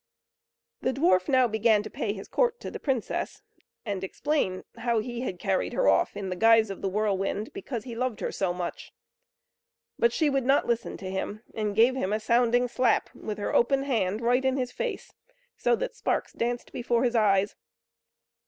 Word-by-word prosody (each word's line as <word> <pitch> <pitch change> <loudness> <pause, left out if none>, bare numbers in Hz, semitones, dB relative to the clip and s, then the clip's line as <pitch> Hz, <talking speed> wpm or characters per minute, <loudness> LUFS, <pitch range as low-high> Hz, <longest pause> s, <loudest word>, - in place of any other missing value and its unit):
The 260 - 0
dwarf 185 - +3
now 255 -2 +5
began 220 -1 +3
to 215 - -7
pay 205 - -2
his 195 -1 -7
court 485 -1 +1
to - - -6
the - - -6
princess, 260 -6 -2 0.4
and 200 -3 -3
explain 190 -3 -1
how 235 0 0
he 240 +2 -3
had 190 -8 -3
carried 190 +1 -1
her - - +1
off - - +3
in 195 -2 -4
the 185 - -2
guise 225 +1 +5
of 195 - -7
the 195 - -1
whirlwind, 205 +1 -1
because 275 - -5
he 240 - -7
loved 250 -2 -2
her - - -2
so 190 -2 -1
much. 175 -1 -5 1.1
But 470 0 +4
she 315 - +1
would 275 -2 +1
not 275 +1 +4
listen 235 -1 -1
to 185 -1 -6
him, 205 +3 -4
and 210 -2 -2
gave 235 +4 +5
him 205 -6 -1
a 215 - +1
sounding 240 +2 +3
slap 245 -1 +1
with 215 -2 -6
her 205 - -3
open 270 +3 +3
hand 220 -6 0
right 245 +2 +2
in 265 0 +1
his 250 -2 -2
face, - - -4 0.4
so 475 - +2
that - - -4
sparks - - -1
danced 240 +1 -2
before 240 0 0
his 245 -1 +1
eyes. 200 -2 +3
230 Hz, 190 wpm, -27 LUFS, 205-255 Hz, 1.1 s, now